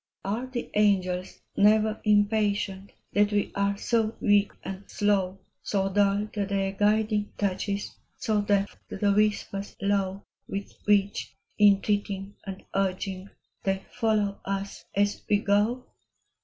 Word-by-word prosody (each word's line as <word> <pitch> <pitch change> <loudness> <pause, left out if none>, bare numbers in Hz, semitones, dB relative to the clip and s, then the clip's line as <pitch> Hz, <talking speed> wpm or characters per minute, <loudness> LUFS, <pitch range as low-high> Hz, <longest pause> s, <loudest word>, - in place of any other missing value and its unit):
i 205 +4 0
RE 260 - -6
the 255 -2 -5
angels 185 -3 +1
never 215 +1 +4
impatient 205 -2 +1 0.2
That 205 0 +3
we 205 -1 0
are 200 0 0
so 225 0 0
weak 205 -1 +3
and 190 +1 -6
slow, 195 -2 +1 0.2
So 195 -1 0
dull 205 0 +3
to 205 -2 -1
their 195 -1 0
guiding 210 +1 +1
touches, 200 0 -2 0.2
So 215 -2 +1
deaf 205 -1 +1
to - - -5
the 200 0 +3
whispers 205 -1 0
low 200 -1 0 0.2
With 200 0 -5
which, 205 -1 +1 0.2
entreating 200 -1 +2
and 190 -1 -6
urging, 190 0 -2 0.3
They 195 0 0
follow 215 -4 0
us 195 0 -4
as 205 +1 +1
we 205 - +5
go? 210 +5 +1
205 Hz, 130 wpm, -27 LUFS, 195-210 Hz, 0.3 s, we